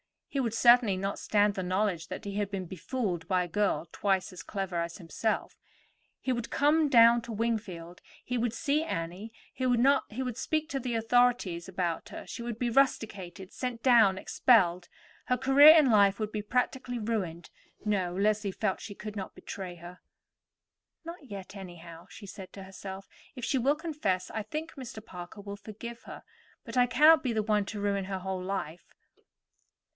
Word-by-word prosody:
He 275 Hz, -, -2 dB
would 235 Hz, -4 st, 0 dB
certainly 235 Hz, -3 st, +5 dB
not 195 Hz, +1 st, -3 dB
stand 205 Hz, -1 st, +2 dB
the 195 Hz, -, -3 dB
knowledge 185 Hz, -2 st, -1 dB
that -, -, -7 dB
he 200 Hz, -1 st, -5 dB
had 205 Hz, -1 st, -1 dB
been 195 Hz, -2 st, -4 dB
befooled 185 Hz, 0 st, -3 dB
by 185 Hz, -2 st, +2 dB
a -, -, -5 dB
girl 205 Hz, -2 st, 0 dB
twice 195 Hz, -2 st, 0 dB
as 180 Hz, -, -8 dB
clever 195 Hz, -4 st, -4 dB
as 170 Hz, 0 st, -3 dB
himself. 200 Hz, +5 st, -2 dB, 0.6 s
He 260 Hz, -, -1 dB
would 235 Hz, -2 st, -2 dB
come 300 Hz, +2 st, +3 dB
down 235 Hz, -1 st, +7 dB
to 235 Hz, -, -6 dB
Wingfield, 205 Hz, -6 st, -3 dB, 0.2 s
he 250 Hz, -, -2 dB
would 235 Hz, -1 st, 0 dB
see 285 Hz, +5 st, 0 dB
Annie, 185 Hz, -, -4 dB, 0.2 s
he 255 Hz, -, -1 dB
would 250 Hz, -1 st, +1 dB
speak 310 Hz, +3 st, -1 dB
to 275 Hz, -, -2 dB
the 245 Hz, -2 st, -3 dB
authorities 225 Hz, -7 st, +2 dB
about 175 Hz, -3 st, -3 dB
her, -, -, -8 dB
she -, -, -7 dB
would 235 Hz, -2 st, -4 dB
be 240 Hz, 0 st, -1 dB
rusticated, 200 Hz, -8 st, 0 dB
sent 250 Hz, -3 st, -5 dB
down, 225 Hz, -7 st, +5 dB
expelled. 180 Hz, -6 st, +3 dB, 0.4 s
Her 250 Hz, -, +1 dB
career 280 Hz, +5 st, +8 dB
in 295 Hz, -6 st, +5 dB
life 200 Hz, -2 st, +5 dB
would 215 Hz, -1 st, -3 dB
be 215 Hz, -, -3 dB
practically 250 Hz, +3 st, -1 dB
ruined. 195 Hz, -7 st, -3 dB, 0.3 s
No. 190 Hz, -4 st, 0 dB
Leslie 205 Hz, +1 st, +1 dB
felt 190 Hz, -, -1 dB
she 205 Hz, -, -8 dB
could 210 Hz, +1 st, -7 dB
not 190 Hz, -, -6 dB
betray 185 Hz, -3 st, -7 dB
her. 175 Hz, +1 st, -11 dB, 1.1 s
"Not 335 Hz, -3 st, -8 dB
yet, 195 Hz, -1 st, -8 dB
anyhow," 175 Hz, -2 st, -10 dB
she 210 Hz, -, -11 dB
said 190 Hz, -1 st, -10 dB
to 195 Hz, -, -9 dB
herself. 190 Hz, 0 st, -9 dB, 0.3 s
"If 250 Hz, -, -8 dB
she 265 Hz, -, +1 dB
will 275 Hz, +4 st, +3 dB
confess, 290 Hz, -, -2 dB
I 220 Hz, -, -3 dB
think 310 Hz, +9 st, -5 dB
Mr. 235 Hz, -5 st, -9 dB
Parker 180 Hz, +3 st, -9 dB
will 200 Hz, 0 st, -7 dB
forgive 230 Hz, +3 st, -9 dB
her, -, -, -10 dB, 0.4 s
but -, -, -6 dB
I 245 Hz, 0 st, +5 dB
cannot 305 Hz, +5 st, +6 dB
be 255 Hz, -5 st, -1 dB
the 215 Hz, -1 st, 0 dB
one 210 Hz, -1 st, +1 dB
to 205 Hz, +1 st, -6 dB
ruin 200 Hz, -1 st, 0 dB
her 190 Hz, 0 st, -4 dB
whole 190 Hz, 0 st, -4 dB
life." 180 Hz, -3 st, -5 dB
210 Hz, 180 wpm, -29 LUFS, 190-245 Hz, 1.1 s, career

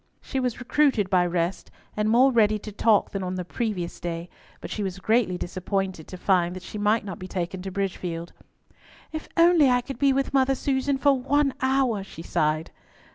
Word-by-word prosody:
She 265 Hz, -, -4 dB
was 250 Hz, -2 st, -2 dB
recruited 250 Hz, -6 st, +2 dB
by 180 Hz, -1 st, +4 dB
rest, 175 Hz, +1 st, -2 dB, 0.3 s
and 210 Hz, 0 st, 0 dB
more 255 Hz, +4 st, +5 dB
ready 215 Hz, -3 st, +3 dB
to 210 Hz, +1 st, -9 dB
talk 210 Hz, 0 st, +2 dB
than 195 Hz, -, -3 dB
on 185 Hz, 0 st, -3 dB
the 180 Hz, -1 st, -4 dB
previous 190 Hz, -4 st, -3 dB
day, 170 Hz, 0 st, -5 dB, 0.3 s
but -, -, -8 dB
she 215 Hz, -, -3 dB
was 190 Hz, -2 st, -3 dB
greatly 215 Hz, -2 st, +1 dB
disappointed 185 Hz, -1 st, -3 dB
to 185 Hz, -, -8 dB
find 180 Hz, -1 st, +1 dB
that 185 Hz, -, -8 dB
she 210 Hz, -, -7 dB
might 210 Hz, +1 st, +2 dB
not 190 Hz, -4 st, -6 dB
be 185 Hz, -, -7 dB
taken 180 Hz, 0 st, -4 dB
to 190 Hz, -, -5 dB
Bridgefield. 180 Hz, -3 st, -4 dB, 0.8 s
"If 315 Hz, 0 st, -6 dB
I 335 Hz, -, +7 dB
could 335 Hz, -, +4 dB
only 255 Hz, -1 st, +3 dB
be 280 Hz, -1 st, +4 dB
with 270 Hz, +1 st, 0 dB
Mother 270 Hz, 0 st, +3 dB
Susan 270 Hz, +1 st, 0 dB
for 280 Hz, +1 st, +4 dB
one 275 Hz, +1 st, +1 dB
hour," 260 Hz, -6 st, +1 dB
she 165 Hz, -4 st, -10 dB
sighed. 155 Hz, -1 st, 0 dB
205 Hz, 195 wpm, -25 LUFS, 180-260 Hz, 0.8 s, I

